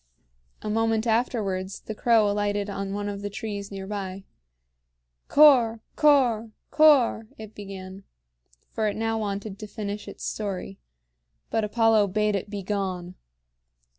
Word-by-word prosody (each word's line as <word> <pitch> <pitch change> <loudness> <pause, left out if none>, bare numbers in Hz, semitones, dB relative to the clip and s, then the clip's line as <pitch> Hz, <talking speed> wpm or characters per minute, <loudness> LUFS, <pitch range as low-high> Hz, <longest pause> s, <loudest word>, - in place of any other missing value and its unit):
A 215 - -3
moment 225 0 +1
afterwards 210 -5 -1
the 220 - -6
crow 225 -1 +3
alighted 205 0 -1
on 195 0 -4
one 205 +1 -3
of 200 -1 -5
the 205 - -3
trees 200 -1 -5
near 195 -1 -6
by. 195 -1 -5 1.0
"Cor 245 -7 +6
Cor 255 -7 +3 0.2
Cor," 275 -8 +5
it 220 -1 -10
began; 195 -1 -9 0.7
for 220 -1 -1
it 205 - -2
wanted 215 -2 -2
now - - -9
to 215 - -7
finish 205 -1 -5
its - - -9
story. 195 - -4 0.7
But 225 - +1
Apollo 220 -1 +3
bade 210 +1 +1
it 195 +1 -3
begone. 190 -3 -3
210 Hz, 135 wpm, -26 LUFS, 200-225 Hz, 1.0 s, Cor